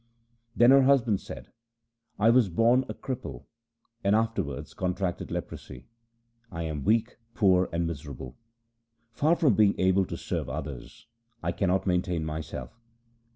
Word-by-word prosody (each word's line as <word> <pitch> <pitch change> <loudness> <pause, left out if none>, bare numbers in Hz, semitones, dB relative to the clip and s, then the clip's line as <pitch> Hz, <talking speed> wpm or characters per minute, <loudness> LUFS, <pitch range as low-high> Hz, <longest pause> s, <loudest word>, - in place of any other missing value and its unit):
Then 120 +2 +6
her 135 0 +7
husband 130 -7 +3
said: - - -10 0.3
' - - -52 0.3
I 110 +2 +5
was 120 -4 +4
born 120 +8 +3
a - - -3
cripple, 115 - -6 0.6
and 100 +1 +3
I 110 - +5
afterwards 70 - -5
contracted 90 -1 -2
leprosy. 60 +1 -7 0.7
I 85 -1 -4
am 75 -3 -4
weak, 115 - +1 0.2
poor, 95 -3 +3
and 85 0 -1
miserable. 70 -5 -7 0.8
Far 155 +8 +2
from 150 -8 +3
being 100 0 +3
able 95 +1 +3
to 85 - -5
serve 80 -8 -4
others, 70 -2 -7 0.4
I - - 0
cannot 95 -1 0
maintain 90 -3 0
myself. 80 +8 -6
95 Hz, 145 wpm, -27 LUFS, 80-115 Hz, 0.8 s, her